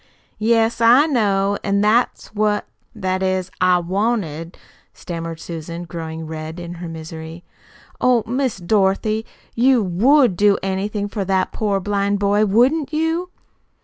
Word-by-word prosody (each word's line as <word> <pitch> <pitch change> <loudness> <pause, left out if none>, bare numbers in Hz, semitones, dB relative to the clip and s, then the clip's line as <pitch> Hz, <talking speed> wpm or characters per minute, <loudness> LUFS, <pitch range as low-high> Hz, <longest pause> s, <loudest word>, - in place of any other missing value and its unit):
"Yes, 225 +1 +2
I 245 +6 +6
know. 205 -8 +1
An' 200 0 +1
that's 220 +2 +1
what 210 0 0 0.3
that 185 -3 -2
is, 185 -1 -1
I 185 -1 +5
wanted 175 -3 -2 0.2
" - - -34
stammered 165 -1 -6
Susan, 170 +1 -6
growing 160 -1 -6
red 160 +1 -6
in 175 0 -7
her 175 - -5
misery. 160 +1 -8 0.6
"Oh, 250 -3 +3
Miss 255 0 -1
Dorothy, 205 +3 +1 0.3
you 250 -1 +3
WOULD 230 - +3
do 205 +1 +4
anything 200 +2 -2
for 205 -1 -3
that 190 0 0
poor 205 -3 -1
blind 200 +1 0
boy, 205 +1 +2
wouldn't 260 +10 +2
you?" 325 +3 -1
200 Hz, 140 wpm, -20 LUFS, 175-225 Hz, 0.6 s, I